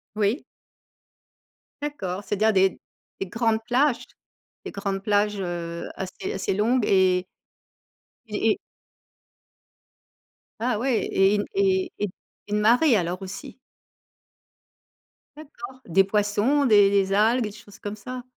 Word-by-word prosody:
Oui. 215 +7 0 1.4
D'accord, 200 -10 -4
c'est-à-dire 215 +2 +2
des 190 0 +3 0.4
des 195 - -2
grandes 225 +2 0
plages 245 0 +2 0.6
des - - -5
grandes 200 -1 -3
plages, 205 0 +1
heu, 170 -2 -4
assez 190 0 -5
assez 190 - -1
longues 225 +4 +2
et 185 -1 +3 1.0
et - - 0
et - - 0 2.0
Ah 240 -2 +1
ouais, 245 0 0
et 195 +2 +3
une 205 - 0
et 380 -2 +1
et 205 -2 -1 0.4
une 210 0 +1
marée 240 +4 +5
alors 180 +1 -2
aussi? 190 +6 -8 1.8
D'accord, 260 -4 -10
des 190 +3 +4
poissons, 210 +8 +1
des 205 -4 +6
des 195 -1 +2
algues, 225 +4 +3
des 210 - -4
choses 205 0 -15
comme 205 0 -5
ça? 250 +4 -7
210 Hz, 120 wpm, -25 LUFS, 195-240 Hz, 2.0 s, des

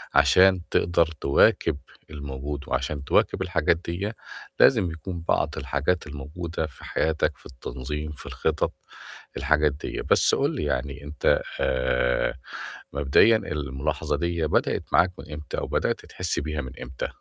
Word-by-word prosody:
عشان 95 -1 +6
تقدر 85 -1 +3 0.2
تِواكِب 70 0 +4 0.3
الموجود 70 0 -5
وعشان 70 -2 -2
تِواكِب 90 - +2
الحاجات 85 -3 +2
ديّة، 100 +6 -3 0.4
لازم 90 -3 +5
يكون 85 +1 -6
بعض - - +1
الحاجات 75 +3 -1
الموجودة 80 +3 -4
في 70 - -16
حياتك 80 -1 0
في - - -23
التنظيم، 75 +4 -5
في 75 - -9
الخِطَط، - - -1 0.6
الحاجات 75 -1 +3
ديّة. 70 - -5
بس - - +5
قُل - - +1
لي - - -2
يعني 70 0 -2
أنت 75 +1 +1 0.2
آآ 65 -1 +1 0.6
مبدئيًا 70 +11 +5
الملاحظة 75 -9 -2
ديّة 85 -2 0
بدأت - - +1
معاك 90 0 +5
من 75 - -9
إمتى 75 0 -6
أو - - -4
بدأت - - -1
تحِس - - -2
بيها 75 -1 -3
من 65 - -7
امتى؟ 70 - -4
75 Hz, 140 wpm, -25 LUFS, 70-85 Hz, 0.6 s, عشان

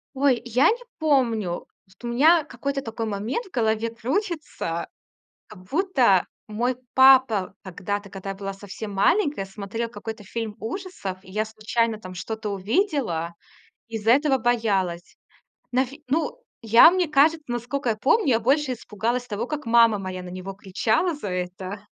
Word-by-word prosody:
Ой, 265 -3 +2
я 245 +3 +4
не 480 +2 -1 0.2
помню. 235 - +1 0.2
Вот 185 +5 -24
у - - -3
меня 310 +7 +5
какой-то 280 -1 -4
такой 225 0 -4
момент 215 - -3
в - - -17
голове 225 -1 0
крутится. 260 - -3 0.6
Как 215 - -13
будто 250 - +2 0.2
мой 240 +4 -1 0.2
папа 260 -8 +5
когда-то, 200 +2 -4
когда 195 0 -6
я 195 - -3
была 195 0 -5
совсем 205 +2 -8
маленькая, 285 - +2
смотрел 210 +4 -5
какой-то 225 -2 -8
фильм 225 +1 -5
ужасов, 225 - -5
и 190 - -15
я 215 +3 0
случайно 220 +1 -1
там 185 -2 -9
что-то 215 +3 -5
увидела, 200 - -1 0.5
из-за 225 -1 +1
этого 275 +1 +4
боялась. 205 -8 0 0.6
Навь 260 +1 +1
ну, 325 - -1 0.2
я, 230 +7 +8
мне 360 -2 +1
кажется, 305 +3 +4
наскока 240 +2 -2
я 220 - 0
помню, 290 - +2
я 230 -3 +4
больше 270 +3 +2
испугалась 235 +2 -3
того, 220 +1 -3
как 300 +2 -4
мама 230 -2 +5
моя 185 -1 -5
на 180 - -9
него 185 +2 -6
кричала 220 - 0
за 290 -9 -6
это: 185 +2 -5
225 Hz, 155 wpm, -24 LUFS, 200-270 Hz, 0.6 s, я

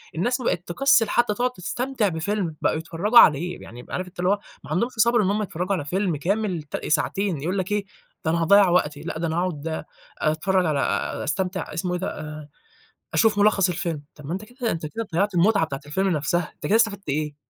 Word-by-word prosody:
الناس 245 +10 0
بقت 175 -7 0
تكسِّل 245 +3 +3
حتى 240 -3 +2
تقعد 245 +4 0
تستمتع 245 +2 -2
بفيلم، 170 0 -2
بقوا - - +2
يتفرجوا 175 +9 +4
عليه، 175 +4 +4
يعني 120 +2 -11
عارف 185 0 -3
أنت 180 0 -15
اللي 180 +1 +2
هو، 205 +1 +2 0.3
ما - - -10
عندهمش 230 +10 +1
صبْر 235 +1 +3
إن 190 - +1
هُم 210 +1 0
يتفرجوا 185 0 -2
على 155 -6 -4
فيلم 180 +2 0
كامل، 190 +1 -1
ت 150 - -5
ساعتين، 180 +1 0
يقول 180 +6 -1
لَك 190 +1 -2
إيه، 205 -1 0 0.4
ده 160 - +2
أنا 170 - +1
هاضيَّع 200 +3 +6
وقتي، 150 -4 +1
لأ 160 0 -5
ده 170 - -1
أنا 160 +1 -2
هاقعد 165 -3 -2 0.3
أتفرج 180 +5 +1
على 150 -4 +1 0.4
أستمتع 180 +2 -2
اسمه 180 +3 -2
إيه 180 - -1
ده؟ 190 - -2
آآ، 150 -1 -8 0.7
أشوف 220 -3 +3
ملخص 200 -2 +4
الفيلم. 165 -3 -3
طَب 150 - -12
ما 155 - -4
أنت 195 +4 -4
كده 245 +1 -3
أنت 160 -2 -3
كده 225 +7 -5
ضيّعت 195 +3 +1
المتعة 195 0 +3
بتاعة 135 -3 -5
الفيلم 190 +7 0
نفْسَها، 160 0 0
أنت - - -7
كده 215 - +4
استفدت 215 -5 +1
إيه! 150 +1 -2
180 Hz, 215 wpm, -24 LUFS, 160-205 Hz, 0.7 s, هاضيَّع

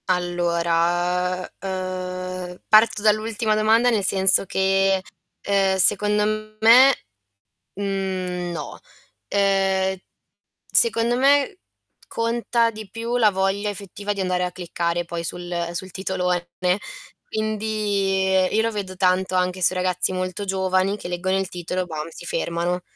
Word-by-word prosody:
Allora, 175 0 0 0.2
ehm, 185 -1 -4
ehm, 180 - -12
parto 215 -1 +5
dall'ultima 215 +1 +1
domanda 220 +3 +4
nel 220 -4 +1
senso 190 0 +3
che, 195 0 +2 0.4
ehm, 195 -1 +1
secondo 210 +2 +1
me, 250 +5 +7 0.8
mhmm, 185 -3 -3
no. 155 -4 -6 0.5
Ehm, 195 -1 +1 0.7
secondo 235 +1 +3
me, 285 +8 +3 0.5
conta 230 0 0
di 215 -2 -10
più 230 +4 -3
la 220 -3 +4
voglia 195 +2 0
effettiva 200 +1 -5
di 200 - -4
andare 180 -1 0
a 180 - -2
cliccare 175 -1 -3
poi 170 0 -5
sul 175 0 -4
sul 185 +2 -6
titolone, 180 -2 -2 0.8
quindi 210 -3 -1 0.3
io 220 - +4
lo 230 0 0
vedo 195 -3 -5
tanto 185 0 +1
anche 180 0 0
sui 185 +1 +3
ragazzi 180 0 +1
molto 185 +2 -3
giovani 190 0 +1
che - - -8
leggono 185 +2 -1
il 190 -1 -3
titolo 180 +1 -3
e - - -3
bam 155 -2 -5
si 175 - -11
fermano. 175 +1 -2
190 Hz, 130 wpm, -22 LUFS, 180-210 Hz, 0.8 s, me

